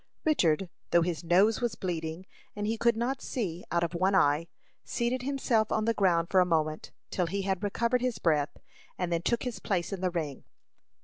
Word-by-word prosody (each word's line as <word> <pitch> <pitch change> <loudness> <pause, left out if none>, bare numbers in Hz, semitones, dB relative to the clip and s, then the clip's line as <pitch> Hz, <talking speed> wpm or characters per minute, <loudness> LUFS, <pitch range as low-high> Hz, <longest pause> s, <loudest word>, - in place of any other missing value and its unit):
Richard, 180 - +2 0.2
though 170 -1 +4
his 170 -1 -2
nose 195 +8 +4
was 235 -3 0
bleeding, 165 -1 -4 0.3
and 205 0 -3
he 220 +2 0
could 235 0 +2
not 255 +3 -1
see 180 -8 -3
out 170 0 +1
of 170 - -2
one 190 +3 +2
eye, 155 -2 +3 0.4
seated 240 +2 -1
himself 250 -5 +1
on 215 - +1
the 230 - +2
ground 175 -5 +2
for 190 - +5
a - - +7
moment, 155 -3 -1 0.2
till 180 -2 0
he 195 +3 -2
had 190 -2 -1
recovered 235 +4 0
his 250 -2 -1
breath, 150 -3 +1 0.4
and 180 -1 -2
then 165 - 0
took 235 +6 0
his 250 -3 -4
place 180 -2 -1
in 190 - -4
the 185 - +1
ring. 155 -6 -4
190 Hz, 200 wpm, -29 LUFS, 170-225 Hz, 0.4 s, a